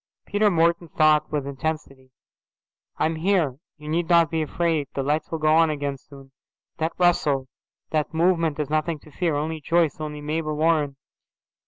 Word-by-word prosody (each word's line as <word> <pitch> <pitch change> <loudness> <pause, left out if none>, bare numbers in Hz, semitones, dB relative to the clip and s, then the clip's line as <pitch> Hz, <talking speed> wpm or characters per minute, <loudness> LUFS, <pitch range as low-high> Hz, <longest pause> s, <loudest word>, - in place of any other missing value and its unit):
Peter 210 +1 +2
Morton 170 -1 +2
thought 155 -1 +3
with 145 -3 -1
intensity, 140 -2 -5 0.9
"I - - +1
am 160 0 -1
here. 160 -7 +1 0.2
You 150 0 -12
needn't 170 +1 +3
be 160 -1 0
afraid. 160 -1 0
The 135 - -1
lights 150 +3 -1
will 165 - -2
go 155 0 +2
on 165 0 +5
again 145 -2 -2
soon. 135 -1 -15 0.5
That 160 +1 -1
rustle, 150 -7 +2 0.4
that 155 -2 0
movement 165 -2 +1
is 150 - -1
nothing 155 +1 0
to 155 - -16
fear. 165 -1 -1
Only 155 +2 -3
Joyce, 165 -1 +1
only 150 -1 -5
Mabel 155 +1 -2
Warren." 155 -3 +2
155 Hz, 165 wpm, -24 LUFS, 145-165 Hz, 0.9 s, on